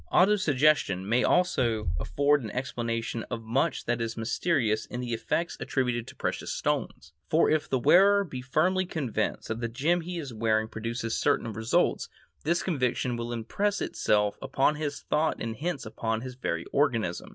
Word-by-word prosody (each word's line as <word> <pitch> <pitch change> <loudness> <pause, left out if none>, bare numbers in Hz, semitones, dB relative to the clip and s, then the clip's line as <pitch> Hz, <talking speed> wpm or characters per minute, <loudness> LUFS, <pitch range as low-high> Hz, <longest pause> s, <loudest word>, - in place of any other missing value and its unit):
Auto 200 +4 +5
suggestion 145 - +2
may 120 +4 +2
also 120 - +2
afford 145 - +2
an 110 - -5
explanation 115 -2 -3
of 115 -2 -4
much 130 +7 0
that 120 0 0
is 115 0 -3
mysterious 115 -1 0
in 120 - -5
the 120 -1 -3
effects 165 +9 -1
attributed 125 -3 -1
to - - -11
precious - - -3
stones, 80 - -2 0.2
for 160 - +4
if 155 -1 +1
the 130 - +2
wearer 200 +10 +5
be 135 -9 -6
firmly 175 +9 +1
convinced 125 - -2
that 110 +1 -3
the 120 - 0
gem 155 +10 +1
he 175 +1 -5
is 140 -7 -5
wearing 110 0 +1
produces 115 +1 -3
certain 115 - +1
results, 110 +1 +1 0.3
this 170 +3 +1
conviction 125 -6 0
will 120 0 -4
impress 195 - -1
itself 105 -1 +1
upon 135 +2 +2
his 150 -1 -4
thought 155 +1 0
and 115 -1 -4
hence 165 -3 -3
upon 110 +1 -2
his 130 0 -6
very 85 -9 -3
organism. 115 - 0
125 Hz, 170 wpm, -28 LUFS, 115-155 Hz, 0.3 s, Auto